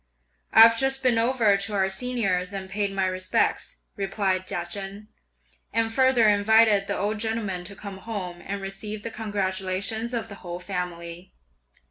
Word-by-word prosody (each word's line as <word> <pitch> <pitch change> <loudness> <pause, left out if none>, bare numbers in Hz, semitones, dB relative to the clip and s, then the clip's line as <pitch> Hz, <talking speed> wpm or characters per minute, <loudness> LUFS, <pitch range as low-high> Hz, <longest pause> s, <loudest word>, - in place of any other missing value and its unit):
"I've 230 +1 +8
just 270 0 0
been 240 -3 +3
over 230 -3 +3
to 200 +2 -3
our 190 -1 +2
Senior's 195 -3 -1
and 195 -1 -5
paid 200 0 -1
my 195 -1 0
respects," 185 0 0 0.2
replied 195 -1 -1
Chia 175 - -2
Chen, 200 +3 -7 0.6
"and 225 0 0
further 260 -3 +4
invited 210 0 +4
the - - -1
old 210 +1 -1
gentleman 215 -5 -2
to 200 +2 -9
come 200 -1 -8
home, 185 -6 -6
and 200 0 -5
receive 205 +2 -5
the 230 - -5
congratulations 200 +2 -2
of 225 -1 -3
the 200 - -9
whole 175 -1 -6
family. 180 -1 -5
200 Hz, 155 wpm, -25 LUFS, 190-225 Hz, 0.6 s, I've